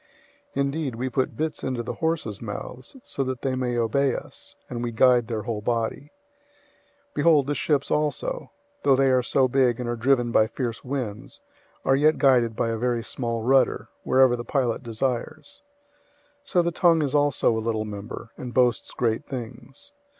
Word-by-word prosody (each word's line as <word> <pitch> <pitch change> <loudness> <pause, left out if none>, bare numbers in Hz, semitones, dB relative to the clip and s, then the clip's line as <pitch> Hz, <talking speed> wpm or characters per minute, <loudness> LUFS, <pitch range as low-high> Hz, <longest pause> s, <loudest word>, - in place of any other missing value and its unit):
003:003 140 - +1
Indeed, 140 -2 -2
we 130 +3 -2
put 130 +1 -1
bits 155 0 -3
into 130 -3 -2
the - - -4
horses' 160 -11 -2
mouths 120 - -7
so 135 - -3
that 130 -2 -4
they 135 - 0
may 125 -2 -1
obey 125 +3 +1
us, - - -10
and 120 -1 -5
we 120 -1 -2
guide 120 0 +4
their 110 -3 -3
whole 110 -1 -3
body. 120 +6 -2 1.0
003:004 - - -42
Behold, 150 -2 +4
the 145 - -1
ships 145 -1 0
also, - - -1 0.3
though 135 - +4
they 135 0 +3
are 130 -1 +4
so 130 +1 +2
big 125 -2 +2
and 125 - -3
are 120 - -1
driven 120 0 +2
by 110 -1 +4
fierce 120 -1 -4
winds, 125 -6 -5 0.4
are 135 - +4
yet 155 +3 +3
guided 120 -4 +3
by 115 - 0
a 115 - -1
very 120 -1 0
small 115 -2 -3
rudder, 135 +2 +2
wherever 130 -2 +4
the 120 - -5
pilot 125 -2 0
desires. 130 - -4 0.8
003:005 - - -16
So 180 - +3
the 170 - 0
tongue 165 -2 +3
is 140 - -2
also 145 -5 +2
a 110 - -1
little 110 -1 -1
member, 105 +2 -7
and 125 -1 -7
boasts 125 -2 +2
great 115 -2 0
things. 130 - -8
125 Hz, 185 wpm, -25 LUFS, 115-140 Hz, 1.0 s, guide